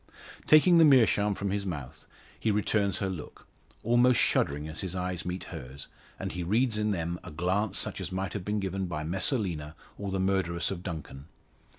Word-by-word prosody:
Taking 170 Hz, +3 st, +7 dB
the -, -, +8 dB
meerschaum 110 Hz, -8 st, +5 dB
from 100 Hz, 0 st, -2 dB
his 100 Hz, 0 st, -1 dB
mouth, 75 Hz, -9 st, -6 dB, 0.3 s
he 110 Hz, -, 0 dB
returns 100 Hz, -2 st, +1 dB
her 100 Hz, -, -1 dB
look 90 Hz, -5 st, -7 dB, 0.4 s
almost 120 Hz, +1 st, +4 dB
shuddering 75 Hz, +2 st, +1 dB
as 80 Hz, 0 st, -5 dB
his 95 Hz, -1 st, -4 dB
eyes 90 Hz, -2 st, -3 dB
meet 90 Hz, +1 st, -3 dB
hers, 70 Hz, -3 st, -8 dB, 0.3 s
and -, -, -4 dB
he 90 Hz, -, -4 dB
reads 110 Hz, +5 st, +1 dB
in 105 Hz, 0 st, +1 dB
them 85 Hz, -3 st, -2 dB
a -, -, -8 dB
glance 95 Hz, +6 st, 0 dB
such -, -, -2 dB
as 95 Hz, 0 st, -5 dB
might 95 Hz, 0 st, -3 dB
have 100 Hz, -, -4 dB
been 105 Hz, +2 st, -1 dB
given 95 Hz, -1 st, -2 dB
by 80 Hz, -3 st, -3 dB
Messalina, 85 Hz, -, -1 dB, 0.2 s
or 100 Hz, -1 st, -3 dB
the 95 Hz, 0 st, -1 dB
murderess 95 Hz, -3 st, 0 dB
of 90 Hz, -3 st, -4 dB
Duncan. 80 Hz, -6 st, -7 dB
95 Hz, 190 wpm, -29 LUFS, 85-105 Hz, 0.4 s, the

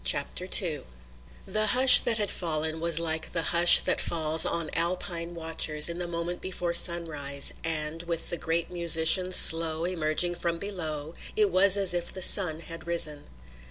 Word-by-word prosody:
CHAPTER -, -, -1 dB
II -, -, -4 dB, 0.6 s
The 215 Hz, 0 st, -3 dB
hush 255 Hz, +4 st, +6 dB
that 230 Hz, -, -2 dB
had 205 Hz, -3 st, -3 dB
fallen 160 Hz, -2 st, -2 dB
was 165 Hz, -1 st, +1 dB
like 160 Hz, -1 st, -2 dB
the 165 Hz, -, -2 dB
hush 170 Hz, 0 st, +7 dB
that -, -, -2 dB
falls 160 Hz, -1 st, +1 dB
on 170 Hz, -2 st, -2 dB
Alpine 170 Hz, 0 st, -2 dB
watchers 160 Hz, -2 st, +1 dB
in 170 Hz, +1 st, -6 dB
the 175 Hz, -, -5 dB
moment 170 Hz, +1 st, -6 dB
before 175 Hz, -2 st, -5 dB
sunrise, 150 Hz, -5 st, +1 dB
and, 160 Hz, 0 st, -2 dB
with 170 Hz, -1 st, -6 dB
the 175 Hz, -, -4 dB
great 165 Hz, +2 st, -4 dB
musician's 170 Hz, +1 st, +1 dB
slow 165 Hz, 0 st, +2 dB
emerging 175 Hz, 0 st, -1 dB
from 170 Hz, -1 st, -5 dB
below, 160 Hz, -6 st, -7 dB, 0.2 s
it 210 Hz, -2 st, 0 dB
was 190 Hz, +2 st, +3 dB
as 195 Hz, -3 st, +3 dB
if 175 Hz, -1 st, -3 dB
the 185 Hz, -, -4 dB
sun 170 Hz, -6 st, +3 dB
had 165 Hz, 0 st, -12 dB
risen. 155 Hz, -4 st, -2 dB
170 Hz, 165 wpm, -25 LUFS, 160-180 Hz, 0.6 s, hush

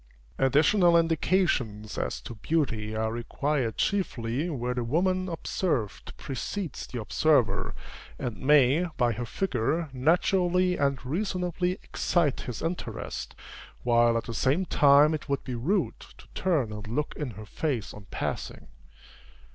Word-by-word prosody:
Additional 170 Hz, +6 st, +5 dB
indications 155 Hz, -, +1 dB
as -, -, -2 dB
to -, -, -8 dB
beauty 110 Hz, -4 st, -1 dB
are 110 Hz, 0 st, 0 dB
required 125 Hz, 0 st, -1 dB
chiefly 145 Hz, -6 st, -1 dB
where 125 Hz, -5 st, -2 dB
the 125 Hz, -1 st, -2 dB
woman 185 Hz, +8 st, +1 dB
observed 160 Hz, -, -2 dB
precedes 170 Hz, +6 st, -4 dB
the 125 Hz, -, -5 dB
observer, 110 Hz, -5 st, +2 dB, 0.4 s
and 120 Hz, -3 st, -4 dB
may, 145 Hz, +4 st, +4 dB
by 120 Hz, -3 st, +3 dB
her 115 Hz, +2 st, -4 dB
figure, 155 Hz, -, -1 dB
naturally 180 Hz, +5 st, +2 dB
and 140 Hz, -3 st, 0 dB
reasonably 180 Hz, +2 st, -1 dB
excite 165 Hz, -6 st, 0 dB
his 125 Hz, -, -6 dB
interest, 170 Hz, +2 st, -4 dB, 0.5 s
while 120 Hz, -1 st, +4 dB
at 115 Hz, -, -2 dB
the 115 Hz, -, -6 dB
same 140 Hz, +11 st, +1 dB
time 145 Hz, -1 st, +5 dB
it 155 Hz, -1 st, -5 dB
would 140 Hz, -1 st, -1 dB
be 130 Hz, -, -5 dB
rude 170 Hz, -, 0 dB
to -, -, -15 dB
turn 150 Hz, -, 0 dB
and 105 Hz, 0 st, -7 dB
look 140 Hz, +7 st, -2 dB
in 150 Hz, -4 st, -3 dB
her 110 Hz, -, -8 dB
face 125 Hz, 0 st, -3 dB
on 105 Hz, -2 st, -11 dB
passing. -, -, -4 dB
140 Hz, 135 wpm, -28 LUFS, 120-170 Hz, 0.5 s, Additional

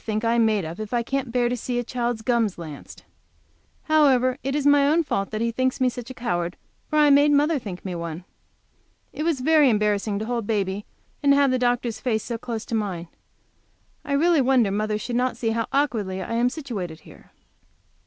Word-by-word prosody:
think 215 Hz, 0 st, -2 dB
I 230 Hz, -, +2 dB
am 230 Hz, -1 st, +4 dB
made 210 Hz, -5 st, 0 dB
of 165 Hz, +4 st, -7 dB
if 215 Hz, +2 st, -4 dB
I 235 Hz, -, +1 dB
can't 270 Hz, 0 st, -3 dB
bear 245 Hz, 0 st, +2 dB
to 245 Hz, -, -1 dB
see 245 Hz, +1 st, -3 dB
a 245 Hz, -, 0 dB
child's 240 Hz, -2 st, -3 dB
gums 230 Hz, -5 st, +1 dB
lanced? 155 Hz, -4 st, -10 dB, 0.8 s
However, 270 Hz, -4 st, +3 dB
it 270 Hz, +1 st, -2 dB
is 295 Hz, -2 st, -1 dB
my 285 Hz, -1 st, +5 dB
own 325 Hz, +3 st, +3 dB
fault 195 Hz, -9 st, -2 dB
that 215 Hz, 0 st, -4 dB
he 230 Hz, 0 st, 0 dB
thinks 255 Hz, +2 st, -1 dB
me 255 Hz, -1 st, +3 dB
such 245 Hz, 0 st, -8 dB
a 260 Hz, -, -8 dB
coward, 175 Hz, -7 st, -2 dB, 0.3 s
for 305 Hz, -, -1 dB
I 295 Hz, -1 st, +6 dB
made 285 Hz, +1 st, +6 dB
mother 295 Hz, +1 st, +3 dB
think 195 Hz, -6 st, -8 dB
me 185 Hz, -, -3 dB
one. 170 Hz, 0 st, -5 dB, 0.9 s
It -, -, -5 dB
was 315 Hz, -4 st, 0 dB
very 305 Hz, 0 st, +5 dB
embarrassing 210 Hz, -1 st, +1 dB
to 215 Hz, -, -3 dB
hold 235 Hz, -2 st, -3 dB
baby 200 Hz, -2 st, -1 dB, 0.3 s
and 280 Hz, -1 st, +4 dB
have 280 Hz, -1 st, +4 dB
the 255 Hz, -, +1 dB
doctor's 245 Hz, -2 st, 0 dB
face 220 Hz, -4 st, -1 dB
so 235 Hz, -2 st, -4 dB
close 230 Hz, -2 st, -5 dB
to -, -, -7 dB
mine. 190 Hz, -6 st, -2 dB, 0.9 s
I 285 Hz, -, -3 dB
really 320 Hz, +1 st, +3 dB
wonder 250 Hz, -5 st, +3 dB
mother 210 Hz, +1 st, -1 dB
should 240 Hz, +3 st, -4 dB
not 255 Hz, +1 st, 0 dB
see 225 Hz, -2 st, -1 dB
how 230 Hz, 0 st, -1 dB
awkwardly 220 Hz, -10 st, 0 dB
I 190 Hz, -, -5 dB
am 240 Hz, +2 st, +2 dB
situated 205 Hz, -, -6 dB
here. -, -, -17 dB
235 Hz, 215 wpm, -24 LUFS, 210-270 Hz, 0.9 s, I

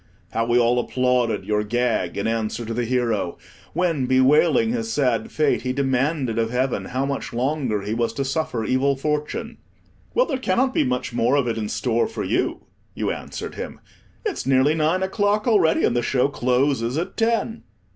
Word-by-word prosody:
How 115 Hz, 0 st, -1 dB
we 120 Hz, 0 st, +3 dB
all 120 Hz, 0 st, +3 dB
applauded 125 Hz, -5 st, 0 dB
your 105 Hz, +1 st, +1 dB
gag 120 Hz, +1 st, 0 dB
in 100 Hz, -, -2 dB
answer 115 Hz, 0 st, -1 dB
to 115 Hz, -, -4 dB
the 120 Hz, +1 st, -1 dB
hero, 115 Hz, -7 st, 0 dB, 0.4 s
when, 165 Hz, -8 st, 0 dB
bewailing 150 Hz, -, +4 dB
his 230 Hz, -2 st, -2 dB
sad 125 Hz, -, 0 dB
fate, 150 Hz, -2 st, +1 dB
he 125 Hz, 0 st, -2 dB
demanded 135 Hz, -2 st, 0 dB
of 115 Hz, 0 st, +1 dB
Heaven 125 Hz, +2 st, -1 dB
how 130 Hz, +2 st, -2 dB
much 140 Hz, -3 st, -4 dB
longer 125 Hz, -4 st, -1 dB
he 105 Hz, +2 st, -2 dB
was 115 Hz, 0 st, 0 dB
to 135 Hz, +4 st, -2 dB
suffer 135 Hz, -5 st, -2 dB
evil 135 Hz, +3 st, +2 dB
fortune. 150 Hz, +2 st, -3 dB, 0.6 s
"Well, -, -, +4 dB
there 270 Hz, -4 st, -2 dB
cannot 255 Hz, +4 st, +1 dB
be -, -, +3 dB
much 125 Hz, -1 st, -2 dB
more 120 Hz, +3 st, +2 dB
of 140 Hz, -3 st, +2 dB
it 115 Hz, -, 0 dB
in 110 Hz, -2 st, -3 dB
store 120 Hz, -2 st, 0 dB
for 225 Hz, -, -5 dB
you," -, -, -1 dB, 0.3 s
you -, -, -1 dB
answered -, -, -6 dB
him; -, -, -7 dB, 0.5 s
"it's 405 Hz, -, -3 dB
nearly 135 Hz, +3 st, +4 dB
nine 160 Hz, +4 st, +1 dB
o'clock 205 Hz, +3 st, 0 dB
already, 195 Hz, -9 st, +3 dB
and 120 Hz, -, +2 dB
the 120 Hz, -, +2 dB
show 125 Hz, +2 st, +1 dB
closes 125 Hz, -1 st, +1 dB
at 170 Hz, -, -3 dB
ten." 230 Hz, 0 st, 0 dB
130 Hz, 185 wpm, -23 LUFS, 120-155 Hz, 0.6 s, bewailing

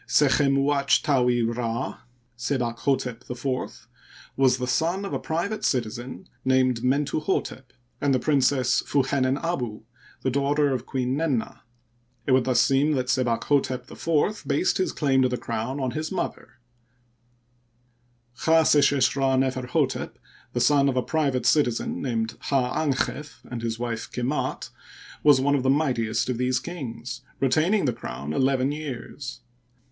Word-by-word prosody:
Sechem 140 Hz, -1 st, +3 dB
uatj 140 Hz, 0 st, +2 dB
taui' 125 Hz, -4 st, +2 dB
Rd, 115 Hz, +1 st, -2 dB, 0.4 s
Sebakhdtep 125 Hz, 0 st, -2 dB
IV, 125 Hz, +1 st, -4 dB, 0.5 s
was 130 Hz, -1 st, +3 dB
the 125 Hz, -, -2 dB
son 170 Hz, +10 st, 0 dB
of -, -, -5 dB
a -, -, -1 dB
private 175 Hz, +7 st, -3 dB
citizen 120 Hz, 0 st, -2 dB, 0.2 s
named 130 Hz, -2 st, +2 dB
MentuhStep 140 Hz, +2 st, 0 dB, 0.4 s
and 140 Hz, -, +2 dB
the 130 Hz, -, +4 dB
Princess 130 Hz, -2 st, +2 dB
Fu 140 Hz, -2 st, +1 dB
henen 130 Hz, 0 st, +1 dB
abu, 125 Hz, -11 st, -3 dB, 0.4 s
the 130 Hz, -, +1 dB
daughter 140 Hz, +1 st, +1 dB
of 125 Hz, -1 st, -4 dB
Queen 130 Hz, -1 st, -1 dB
Nenna, 145 Hz, -6 st, -1 dB, 0.7 s
It -, -, 0 dB
would 130 Hz, -1 st, +4 dB
thus 130 Hz, -2 st, +2 dB
seem 140 Hz, +3 st, +3 dB
that 130 Hz, -2 st, -1 dB
Sebakhdtep 130 Hz, +1 st, 0 dB
IV 165 Hz, +6 st, 0 dB
based 145 Hz, +7 st, +1 dB
his 185 Hz, -, +1 dB
claim 135 Hz, -3 st, +2 dB
to 130 Hz, -, +3 dB
the 125 Hz, -, -2 dB
crown 115 Hz, +5 st, -3 dB
on 130 Hz, -2 st, -1 dB
his 155 Hz, +2 st, -4 dB
mother. -, -, -4 dB, 1.9 s
Chdseshesh 145 Hz, -5 st, +4 dB
Rd 135 Hz, -1 st, +2 dB
Neferhdtep, 130 Hz, -1 st, -1 dB, 0.4 s
the 120 Hz, -, 0 dB
son 140 Hz, +2 st, +4 dB
of 130 Hz, -, -1 dB
a 125 Hz, -, +2 dB
private 140 Hz, -5 st, 0 dB
citizen 125 Hz, -7 st, +1 dB
named 115 Hz, -4 st, -2 dB
Hd 135 Hz, +1 st, +1 dB
dnchef 145 Hz, +3 st, -3 dB
and 120 Hz, -2 st, -6 dB
his 115 Hz, -1 st, -2 dB
wife 115 Hz, -1 st, -4 dB
Kemdt, 125 Hz, +4 st, -2 dB, 0.5 s
was 145 Hz, -3 st, +6 dB
one 140 Hz, +2 st, +2 dB
of 140 Hz, -, +2 dB
the 130 Hz, -, +1 dB
mightiest 125 Hz, -6 st, +1 dB
of 125 Hz, -2 st, -2 dB
these 125 Hz, 0 st, +1 dB
kings, 130 Hz, -7 st, -6 dB, 0.2 s
retaining 155 Hz, +9 st, +2 dB
the 125 Hz, -, +1 dB
crown 70 Hz, -, -6 dB
eleven 135 Hz, -, +2 dB
years. 140 Hz, -2 st, -6 dB
130 Hz, 140 wpm, -25 LUFS, 125-145 Hz, 1.9 s, was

